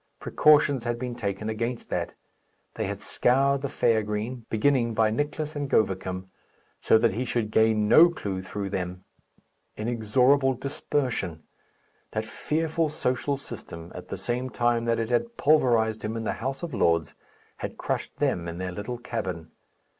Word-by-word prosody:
Precautions 145 -4 +4
had 120 -1 -1
been 125 0 -4
taken 105 -3 -3
against 115 +2 -3
that. - - -2 0.6
They - - -2
had - - -5
scoured 135 +2 +2
the 140 - -2
fair 115 -3 +2
green, 110 +3 -4
beginning 115 0 +2
by 110 -1 +3
Nicless 150 +4 -2
and 145 -1 -3
Govicum, 95 -3 0 0.5
so - - +5
that 110 -2 +2
he 120 +5 -1
should 115 -3 -1
gain 110 -1 +3
no 170 +10 +8
clue 100 - -4
through 100 +1 -5
them. 90 -1 -4 0.7
Inexorable 125 +5 +2
dispersion! 125 - -2 0.7
That 110 0 -1
fearful 160 +7 -1
social 140 0 -1
system, 90 -10 -9
at 90 0 -9
the 100 - -5
same 125 +6 -2
time 120 -1 +1
that 115 0 +2
it 115 +1 -2
had 235 - 0
pulverized 120 -7 +3
him 110 +2 -3
in 115 - -3
the - - -1
House 135 +6 -3
of 165 -5 -4
Lords, 85 -7 +2 0.4
had - - -6
crushed - - -3
them 85 -1 0
in 85 0 -5
their 90 0 -3
little 105 +7 -5
cabin. 95 -9 -5
115 Hz, 160 wpm, -26 LUFS, 105-130 Hz, 0.7 s, no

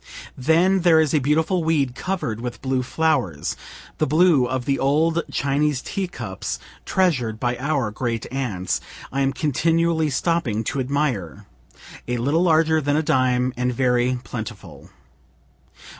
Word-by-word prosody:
Then 170 +8 +3
there 170 -3 +5
is 155 -3 +2
a 155 - +4
beautiful 160 +6 +1
weed 145 -6 +1
cover'd 135 - -3
with 125 0 -5
blue 130 -1 0
flowers, 125 - 0 0.4
(the - - +2
blue 155 -3 +4
of 130 -1 -3
the 135 -1 0
old 160 +5 +2
Chinese 140 0 0
teacups 130 - -4 0.3
treasur'd 125 -13 +1
by 120 0 0
our 135 -5 -1
grand 115 0 -3
aunts,) 115 -9 -2 0.3
I 140 - -1
am 135 0 +2
continually 160 +2 +1
stopping 135 -7 0
to 135 - -3
admire 125 - -2 0.6
a 125 0 -1
little 140 +8 +1
larger 160 -2 +3
than 145 0 0
a 155 - +1
dime, 130 -4 +1
and 125 +1 0
very 125 0 +1
plentiful. 110 -2 -8
135 Hz, 140 wpm, -22 LUFS, 125-160 Hz, 0.6 s, there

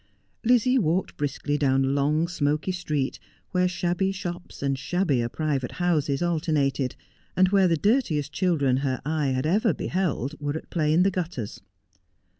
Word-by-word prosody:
Lizzie 250 +2 +4
walked 175 -1 0
briskly 145 0 -2
down 135 -1 +3
a - - 0
long, 145 +4 +1
smoky 155 0 0
street, 150 -7 -2 0.3
where 180 -1 +2
shabby 180 +1 0
shops 175 -5 -6
and 135 -1 +1
shabbier 135 -3 0
private 140 -3 -2
houses 165 -4 0
alternated, 150 -6 0 0.4
and 185 0 +5
where 195 -1 +4
the 165 -2 +2
dirtiest 155 - +1
children 145 -9 +2
her 135 -1 -1
eye 150 -1 0
had 130 0 0
ever 200 - +2
beheld 160 -7 -1
were 145 +1 -2
at - - -11
play 155 -3 +1
in 170 +3 +4
the 195 - +3
gutters. 165 - -4
155 Hz, 155 wpm, -25 LUFS, 140-180 Hz, 0.4 s, and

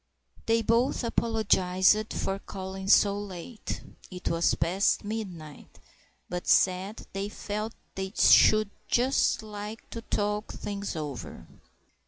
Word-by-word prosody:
They 225 0 +3
both 235 +4 +2
apologised 215 -3 +2
for 195 0 -2
calling 190 -1 -7
so 200 0 +5
late 205 +3 -7 0.3
(it 180 -1 -4
was 165 0 +2
past 185 +5 +1
midnight), 185 -9 -7 0.5
but 180 0 -5
said 190 +3 +2
they 195 +1 -3
felt 210 +2 -5 0.2
they 190 0 -4
should 215 -1 +6 0.2
just 250 -1 +2
like 210 +1 -8
to 230 - -5
talk 210 -1 -2
things 200 -2 -5
over. 140 - -6
200 Hz, 115 wpm, -28 LUFS, 185-215 Hz, 0.5 s, should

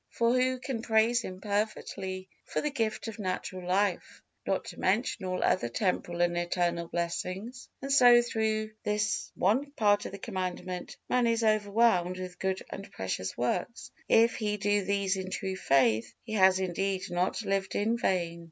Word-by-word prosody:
For 235 0 +1
who 255 0 +2
can 250 -2 -4
praise 230 +1 +3
Him 185 -4 -7
perfectly 200 -2 -3 0.2
for - - -1
the 300 - -1
gift 225 -4 -2
of 225 -1 -7
natural 185 -1 -4
life, 190 0 0 0.2
not - - 0
to - - -9
mention 200 +1 0
all 185 0 -1
other 120 - +2
temporal 175 - -1
and 175 0 +2
eternal 175 -1 0
blessings? 185 +8 -4
And 275 - -3
so 245 -3 +8
through 220 -2 -1
this 210 +1 -1
one 245 +10 +2
part 205 -5 +2
of - - -8
the 200 - -7
Commandment 185 -4 -4
man 250 -1 +2
is 230 0 +1
overwhelmed 205 -4 +3
with 180 -1 -7
good 190 0 -1
and 195 - -8
precious 95 0 -4
works; 125 - -2 0.2
if 230 +1 +5
he 210 -1 -1
do 205 0 +1
these 200 -1 +1
in 185 0 -4
true 190 0 -3
faith, 135 - +2
he 220 - -7
has 190 -2 +5
indeed 190 +1 -1
not 180 +5 0
lived 195 -1 -1
in 220 +3 +1
vain. 170 -5 0
195 Hz, 170 wpm, -29 LUFS, 185-225 Hz, 0.2 s, so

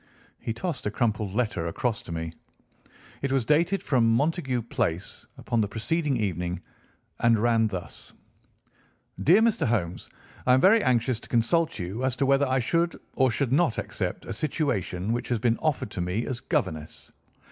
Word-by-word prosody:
He - - -3
tossed 155 - -3
a - - +1
crumpled 105 -3 -1
letter 105 -8 0
across 115 +6 -1
to - - -10
me. 80 0 -4 0.9
It 140 - -1
was 135 -4 +1
dated 170 - +2
from 115 -4 +3
Montague 135 -3 0
Place 100 -6 -3
upon 115 -2 0
the 105 - +1
preceding 140 +6 -1
evening, 90 -4 -2 0.6
and 115 -1 +4
ran 115 0 +3
thus: 95 -4 -7 1.1
"DEAR 190 +8 +6
MR. 210 - +2
HOLMES,—I 110 +4 -1
am - - +4
very 205 +7 +5
anxious 120 -1 +1
to - - -15
consult 155 +8 +2
you 95 +6 -4
as 130 -1 +1
to 135 - +1
whether 135 +1 +3
I 130 0 +1
should 170 +7 0
or 130 -1 +3
should 125 +2 -1
not 145 -4 +2
accept - - -3
a - - -4
situation 115 - -1
which 120 - -3
has 120 - +1
been 115 +1 +1
offered 150 -9 -1
to 95 - -3
me 90 +6 -1
as 125 -3 -3
governess. 80 -8 -3
120 Hz, 170 wpm, -26 LUFS, 105-140 Hz, 1.1 s, DEAR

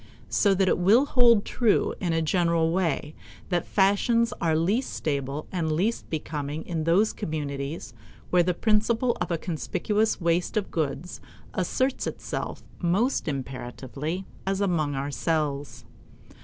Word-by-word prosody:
So 200 -2 +3
that 190 0 +2
it 180 - +2
will 215 +10 +5
hold 240 -6 +4
true 230 -4 +2
in 175 -3 -1
a 165 0 +1
general 170 -1 +2
way 165 -4 0 0.4
that 175 -2 0
fashions 215 +4 +3
are 165 -2 +2
least 200 +11 0
stable 140 0 -2
and 165 -4 -1
least 195 +9 0
becoming 150 -1 -4
in 160 -3 -2
those 190 +6 +3
communities 145 - -4 0.4
where 180 - +5
the 175 0 +1
principle 225 +4 +2
of - - -1
a 170 - 0
conspicuous 210 +6 -1
waste 170 +4 +1
of 205 - -1
goods 155 +2 -3 0.3
asserts 260 +8 0
itself - - -5 0.2
most 195 +9 +1
imperatively, 135 +5 -4 0.2
as 195 0 -1
among 165 -8 +1
ourselves. 140 -3 -2
170 Hz, 135 wpm, -26 LUFS, 150-200 Hz, 0.4 s, will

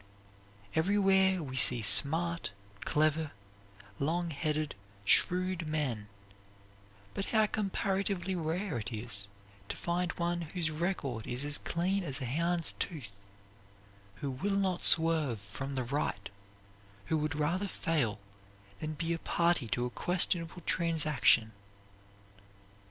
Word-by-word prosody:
Everywhere 190 0 +2
we 130 -3 -7
see 125 -2 +9
smart, 165 +7 +6 0.4
clever, 155 0 0 0.7
longheaded, 155 -1 -2 0.3
shrewd 180 - +2
men, 130 -9 -3 1.1
but 195 - -4
how 220 -1 +2
comparatively 195 -2 -2
rare 170 - -3
it 115 +3 -6
is 105 -3 -1 0.4
to - - -3
find 175 +1 -2
one 175 0 -2
whose 165 0 -3
record 150 - -3
is 125 +3 -3
as 145 0 +3
clean 185 +3 -2
as 140 -4 -3
a 130 - -4
hound's 170 +6 -1
tooth; 145 - -5 1.1
who 135 +8 -5
will 195 +10 -2
not 190 -3 -1
swerve 160 -8 +3
from 135 +8 -7
the 130 - -2
right; 120 -7 -3 0.7
who 160 - 0
would 150 -1 -2
rather 170 +7 -1
fail 145 - -1 0.6
than 155 0 -4
be 165 +2 -3
a 165 - -4
party 170 -8 0
to 120 +2 -2
a 125 - -5
questionable 175 +1 0
transaction! 150 - +2
160 Hz, 120 wpm, -31 LUFS, 135-175 Hz, 1.1 s, see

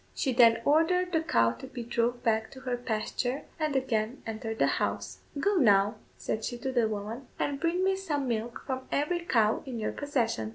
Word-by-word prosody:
She 265 - 0
then 230 -1 +6
ordered 360 +5 +3
the 320 - +2
cow 115 - +3
to 115 - -9
be 240 - -6
drove 235 +1 -1
back 220 -2 +1
to 260 - -11
her 255 -2 -1
pasture, 245 +3 -2 0.2
and 305 -2 0
again 245 -1 -1
entered 225 0 -4
the - - +4 0.2
house. - - -2 0.2
"Go, 405 +6 +2
now," 205 - +5 0.2
said 220 - -3
she 240 +2 -3
to 265 +2 -3
the 240 -3 +2
woman, 215 +5 -5
"and 280 -1 -1
bring 340 +3 +1
me 385 0 +3
some 300 -8 -2
milk 230 0 -3
from 260 -1 -4
every 300 +5 +1
cow 225 -10 +2
in 255 -3 -6
your 215 - -1
possession." 235 - -1
245 Hz, 200 wpm, -29 LUFS, 220-290 Hz, 0.2 s, then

